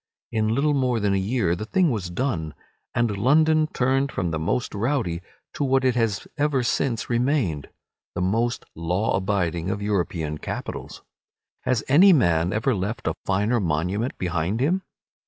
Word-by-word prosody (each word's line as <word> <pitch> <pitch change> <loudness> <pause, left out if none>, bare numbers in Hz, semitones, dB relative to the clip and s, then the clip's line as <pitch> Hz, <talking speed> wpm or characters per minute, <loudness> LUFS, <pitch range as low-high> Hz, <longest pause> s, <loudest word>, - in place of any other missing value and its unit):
In 110 -1 +1
little 140 +7 +2
more 130 -4 +1
than 100 -2 +1
a - - +2
year 95 -3 0
the 105 +4 -6
thing 180 +2 +2
was 100 -6 -3
done, 85 - -2 0.4
and 120 -4 +1
London 155 +8 +3
turned 135 0 +1
from 90 -4 -2
the 80 - -2
most 100 +10 -1
rowdy 105 - -1 0.3
to - - -2
what 135 -1 +2
it 130 - +4
has 115 -4 -1
ever 145 -3 +2
since 120 -1 0
remained, 120 - 0 0.5
the - - -1
most 115 +6 0
law 90 +6 0
abiding 95 -3 -1
of 100 +1 -2
European 85 -6 -1
capitals. - - -6 0.6
Has 125 -4 +1
any 180 +8 +7
man 85 - +3
ever 110 +6 +1
left 105 +3 -3
a 80 - +1
finer 105 +5 +2
monument 90 - -1
behind 90 +4 -1
him? 170 +9 +1
110 Hz, 160 wpm, -24 LUFS, 90-130 Hz, 0.6 s, any